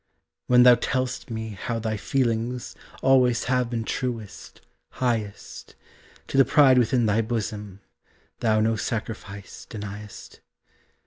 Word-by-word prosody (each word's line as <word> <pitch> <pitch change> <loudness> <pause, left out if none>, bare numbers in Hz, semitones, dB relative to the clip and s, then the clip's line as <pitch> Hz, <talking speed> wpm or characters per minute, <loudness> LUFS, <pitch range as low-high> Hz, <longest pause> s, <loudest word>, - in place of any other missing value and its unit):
When 125 0 +6
thou 125 0 +9
tell'st 130 +1 -2
me 110 -1 -4
how 115 +3 -4
thy 110 -1 -2
feelings 120 +1 -1 0.3
Always 125 -3 +4
have 125 -1 0
been 115 -2 -2
truest, 115 -4 -5 0.3
highest, 115 -5 -3 0.5
To - - -3
the - - +9
pride 130 -1 +5
within 120 0 +2
thy 110 +1 +2
bosom 105 -3 -4 0.6
Thou 110 -1 +2
no 110 +1 +2
sacrifice 105 -3 -6
denyest. 105 -1 -9
115 Hz, 120 wpm, -25 LUFS, 110-125 Hz, 0.6 s, thou